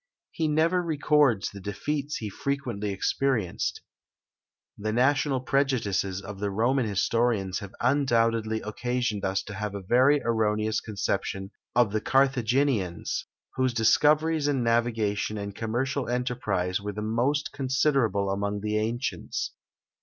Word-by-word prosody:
He 160 - -1
never 165 +4 +2
records 150 - +2
the 100 - -9
defeats 140 +9 -3
he 110 - -4
frequently 120 -6 -3
experienced. 110 0 -1 0.9
The 110 +1 -3
national 135 +2 +2
prejudices 115 -9 0
of 100 -1 -8
the 100 0 -1
Roman 120 +5 +1
historians 100 -2 +1
have 100 -1 -9
undoubtedly 115 -4 +2
occasioned 120 -1 -2
us 95 0 0
to 105 - -8
have 105 0 -4
a 100 - -6
very 130 +8 +4
erroneous 110 -1 +1
conception 100 -2 -3 0.2
of 120 -4 +4
the 110 0 0
Carthaginians, 130 - +1 0.3
whose 130 -2 +1
discoveries 150 +6 +3
in 135 -4 +1
navigation 115 -3 0
and 100 0 -5
commercial 125 +6 -2
enterprises 110 -7 -1
were 105 0 -4
the 105 +1 -4
most 125 +7 0
considerable 130 -7 +1
among 100 +1 -2
the 105 +1 -1
ancients. 115 +4 -2
115 Hz, 125 wpm, -27 LUFS, 105-135 Hz, 0.9 s, very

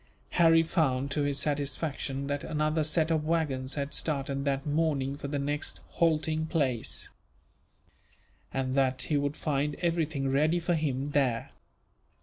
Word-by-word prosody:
Harry 165 -1 +5
found, 140 -5 0
to 145 - 0
his 145 -1 0
satisfaction, 140 -1 -2
that 145 0 -2
another 155 +1 0
set 160 +1 +2
of 155 -2 +2
waggons 150 -5 -1
had 140 0 -3
started 140 -2 -1
that 135 0 0
morning 145 -3 0
for 140 - -6
the 145 +1 -2
next 145 +1 -2
halting 160 -1 +1
place; 135 -9 -1 1.4
and 130 -1 -1
that 130 -1 +2
he 150 - 0
would 145 +1 -1
find 145 0 0
everything 160 -5 0
ready 155 +6 +2
for 175 +1 0
him 145 -3 -1
there. 130 -5 +1
145 Hz, 140 wpm, -29 LUFS, 135-155 Hz, 1.4 s, Harry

